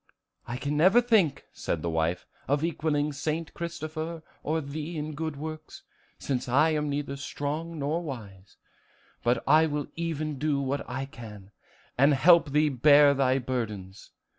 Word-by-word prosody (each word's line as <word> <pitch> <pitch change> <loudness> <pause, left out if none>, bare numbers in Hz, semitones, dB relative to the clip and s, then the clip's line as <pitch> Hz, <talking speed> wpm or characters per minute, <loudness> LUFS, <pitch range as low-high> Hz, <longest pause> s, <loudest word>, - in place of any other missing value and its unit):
"I 120 - -4
can 140 +3 -2
never 185 +9 +6
think," 210 - +2
said 80 - -3
the 85 - -1
wife, 80 +2 -1 0.2
"of 145 +2 +1
equaling 150 -3 0
St. 155 +3 -3
Christopher 165 -1 -5 0.2
or 160 +2 -1
thee 155 +3 -5
in 155 +1 -4
good 160 0 -4
works, 155 +2 -8 0.3
since 130 -2 -3
I 150 +6 +4
am 150 -1 -1
neither 140 -1 -3
strong 150 +4 -4
nor 150 +4 -1
wise; 105 - -9 0.7
but 120 0 +1
I 160 +1 +6
will 145 -1 -2
even 155 -4 -3
do 150 -1 +1
what 140 0 -3
I 130 +2 -3
can, 110 -8 -11 0.5
and 140 +2 +5
help 170 +3 +5
thee 150 +2 +3
bear 145 +2 +6
thy 135 -1 +2
burdens. 110 -7 -4
145 Hz, 155 wpm, -27 LUFS, 130-155 Hz, 0.7 s, never